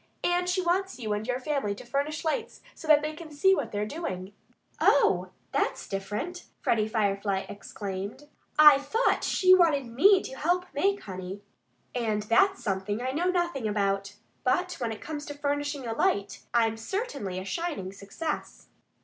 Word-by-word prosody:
And 355 0 +1
she 365 +1 +1
wants 380 +2 0
you 220 -4 -2
and 210 +2 -3
your 250 0 0
family 265 -7 -1
to 225 - -11
furnish 285 +6 -2
lights 445 +9 -2
so 320 - -11
they 305 0 +4
can 310 +1 -10
see 340 +7 +4
what 285 -11 -1
they're 205 0 -1
doing." 205 - -5 0.5
"Oh! - - +4 0.2
That's - - -1
different!" 210 - -4
Freddie 215 -2 +1
Firefly 200 -3 0
exclaimed. 200 +5 -6 0.3
"I 300 -2 +9
thought 435 - +1
she 370 -1 +5
wanted 325 -7 +4
me 370 - +5
to - - -7
help 355 +6 +1
make 395 +7 +1
honey. 190 0 -7 0.5
And 220 -4 -1
that's 245 - +3
something 205 0 -1
I 255 +1 -2
know 340 +6 0
nothing 345 -10 0
about.... 200 -1 -1 0.3
But 360 +8 +1
when 235 -3 -1
it 220 - -7
comes 300 -1 -5
to 290 - -6
furnishing 290 -1 -2
a 225 - -2
light, 200 -3 0
I'm 225 -2 +2
certainly 250 - -3
a 185 - -4
shining 290 - -3
success." 205 +11 -5
265 Hz, 165 wpm, -28 LUFS, 205-330 Hz, 0.5 s, I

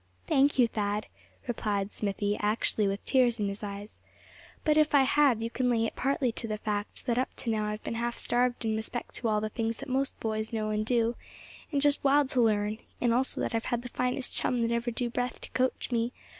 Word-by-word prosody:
"Thank 275 +1 +3
you, 245 -2 +6
Thad," 210 -1 -1 0.4
replied 205 -4 -1
Smithy, 205 0 -1
actually 210 0 +1
with 195 0 -3
tears 245 -3 +3
in 205 - +1
his 200 +1 -6
eyes; 205 0 -7 0.6
"but 305 -1 +3
if 305 -1 +4
I 275 - +7
have, 265 -4 +3
you 230 - -3
can 250 0 0
lay 230 -2 +2
it - - -4
partly 265 -2 +1
to 225 - -4
the 215 -1 -2
fact 210 -1 -3
that 240 -1 +1
up 260 - -2
to 235 - -3
now 215 -1 0
I've 210 0 -4
been - - -3
half 235 +1 -2
starved 245 0 +1
in 220 -1 +1
respect 225 +2 -4
to 235 - -2
all 215 -1 +2
the 215 - -2
things 225 +1 -2
that 275 - -7
most 265 +1 -1
boys 220 0 -2
know 215 -2 -1
and 215 0 0
do, 235 0 +1 0.5
and 285 -2 +1
just 290 0 +3
wild 280 0 +4
to 255 - +2
learn; 215 -1 +1 0.2
and 240 -2 +2
also 260 +2 +1
that - - -2
I've 225 0 -1
had 240 0 -1
the 245 - -6
finest 250 +2 -1
chum 250 - 0
that 230 - -1
ever 235 +1 0
drew 240 0 -2
breath 245 +1 -2
to - - -10
coach 255 +1 0
me. 235 0 0
230 Hz, 230 wpm, -29 LUFS, 215-250 Hz, 0.6 s, I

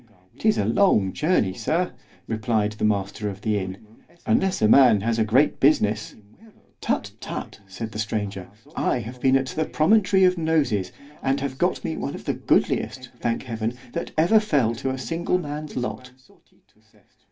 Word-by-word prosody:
——'Tis 215 -1 +2
a - - +1
long 105 - +3
journey, 150 - +1
Sir, 170 - -1 0.4
replied 110 -1 0
the 105 - -7
master 105 0 0
of 95 0 -8
the 105 -1 0
inn——unless 110 - -3
a 110 - +4
man 120 -4 +6
has 115 +1 0
great 115 +7 +3
business.——Tut! 110 - -1
tut! - - -7
said 105 +4 -6
the 105 - -6
stranger, 105 -4 -3 0.3
I - - +1
have 125 +3 -9
been 135 0 +4
at 135 - -1
the 160 - -1
promontory 190 +4 +3
of 180 -1 +4
Noses; 145 - +1 0.3
and 135 +1 0
have 135 -1 -4
got - - 0
me - - -3
one - - -4
of - - -10
the - - 0
goodliest, 130 -1 0
thank 115 -1 -1
Heaven, 115 -1 -3 0.2
that 170 - -3
ever 175 +8 +5
fell 145 - +1
to 130 +3 -3
a 130 - -2
single 165 +8 -1
man's 150 -3 -6
lot. 125 0 -4
125 Hz, 160 wpm, -24 LUFS, 105-155 Hz, 0.4 s, man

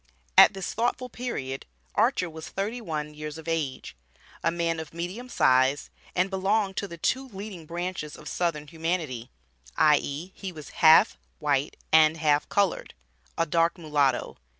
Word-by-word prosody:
At - - +8
this 190 -2 -4
thoughtful 245 +2 -1
period, 140 - -5 0.3
Archer 180 - +2
was 160 -1 -8
thirty 215 +5 -3
one 150 -6 -4
years 150 0 -7
of 160 0 -11
age, 160 -5 -3 0.5
a - - +3
man 165 -1 -1
of 160 0 -8
medium 185 +9 -5
size, 130 - +3 0.2
and 185 +2 +1
belonged 195 +1 +1
to 200 - -1
the 170 - -9
two 260 +10 0
leading 195 -6 -8
branches 175 -2 -4
of 150 - -12
southern 165 -4 -1
humanity, 160 -7 -3 0.5
i.e., 150 +3 +2
he 190 -2 -6
was 155 -4 -10
half 160 0 +7 0.2
white 145 -1 0 0.2
and 160 0 +6
half 150 -2 +2
colored 200 -3 0 0.4
a 165 - +2
dark 165 +1 +2
mulatto. 145 -6 0
165 Hz, 150 wpm, -27 LUFS, 150-190 Hz, 0.5 s, At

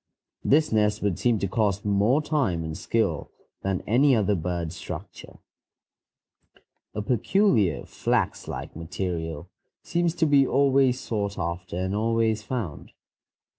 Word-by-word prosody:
This 155 +2 +3
nest 105 -1 +2
would 100 -4 0
seem 120 -2 +2
to 100 - -1
cost 105 -1 0
more 105 +9 +3
time 130 - 0
and 80 -1 -5
skill - - -1 0.3
than 95 -2 -2
any 130 +5 +4
other 105 -2 +2
bird 85 -2 -2
structure. 90 - -8 1.6
A 105 - -2
peculiar 120 - +2
flax - - -1
like - - -6
material 85 -1 -4 0.4
seems 170 -1 0
to 170 - +2
be 140 -3 +4
always 135 -2 +3
sought 100 -4 -3
after 85 +2 -4
and 95 +1 -1
always 110 0 +1
found. 105 - -5
105 Hz, 130 wpm, -26 LUFS, 90-130 Hz, 1.6 s, any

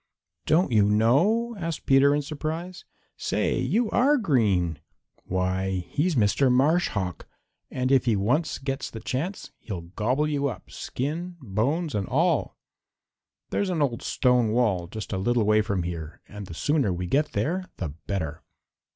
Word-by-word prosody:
"Don't 160 -2 +3
you 110 -3 +5
know?" 175 - +3
asked 165 -3 -4
Peter 140 +1 +5
in 145 - -1
surprise. 160 +5 -5 0.3
"Say, - - 0
you 235 +1 +1
are 280 +5 +4
green! 100 - +1 0.5
Why, 95 0 -1
he's 165 +3 0
Mr. 125 +4 +3
Marsh 150 +8 +3
Hawk, 90 -5 -4 0.4
and 130 +1 -1
if 135 -3 +4
he 115 -3 +3
once 125 +12 0
gets 135 0 -4
the 110 - -8
chance 145 - -4
he'll 95 -6 -6
gobble 120 - 0
you 145 -2 0
up, 125 - -7
skin, 170 +7 -4
bones 140 - -1
and 100 -2 -1
all. 160 +2 +1 0.9
There's 200 - 0
an 165 -5 +1
old 120 -4 -1
stone 125 -3 +2
wall 105 -7 +1
just 110 +2 -6
a 95 - -1
little 120 +4 +2
way 110 +1 +4
from 100 -4 -1
here, 85 -2 -6
and 105 -2 -8
the 85 - -8
sooner 145 - +1
we 90 +1 -3
get 145 - 0
there 185 +5 -1
the 85 - -3 0.2
better!" 80 -6 -3
125 Hz, 160 wpm, -26 LUFS, 100-155 Hz, 0.9 s, you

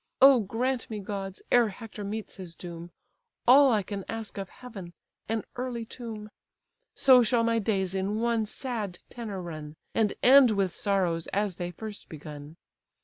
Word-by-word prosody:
O 270 -1 +8
grant 240 +4 -1
me, 220 - -4
gods, 195 -1 -5
ere 240 -3 +5
Hector 210 +1 -8
meets 215 +2 -5
his 180 -3 -8
doom, 170 -1 -8 0.6
All 270 +2 +8
I 215 -3 +2
can 200 0 -5
ask 225 -3 -5
of 195 -1 -5
heaven, 200 -9 -10 0.4
an 225 -1 0
early 245 -2 -3
tomb! 220 -3 -8 0.6
So 260 -2 +7
shall 230 0 +2
my 230 0 +2
days 195 -3 0
in 195 +2 -1
one 230 -2 +1
sad 215 -6 -4
tenor 220 -5 -5
run, 155 -4 -7 0.2
And 215 -3 +1
end 265 0 +8
with 195 -4 +1
sorrows 180 -5 0
as 200 -3 -1
they 175 0 -3
first 210 +4 -8
begun. 150 0 -9
210 Hz, 160 wpm, -28 LUFS, 190-230 Hz, 0.6 s, O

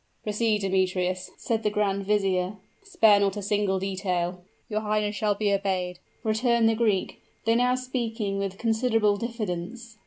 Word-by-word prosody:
"Proceed, 210 0 +1
Demetrius," 185 -1 0
said 225 -1 -1
the 215 - +1
grand 200 -2 -1
vizier, 195 -2 +1 0.3
"spare 285 - +5
not 200 0 +1
a - - -3
single 205 -1 +1
detail." 185 -2 -2 0.3
"Your 215 -1 -1
highness 210 -1 0
shall 210 -1 +1
be 205 -1 +1
obeyed," 185 -3 -1 0.2
returned 230 +1 +2
the 225 - +4
Greek, 215 -4 0 0.2
though 225 - +4
now 250 +2 +3
speaking 230 -6 -2
with 195 -1 -3
considerable 225 -2 +2
diffidence. 225 0 -5
210 Hz, 150 wpm, -26 LUFS, 195-225 Hz, 0.3 s, spare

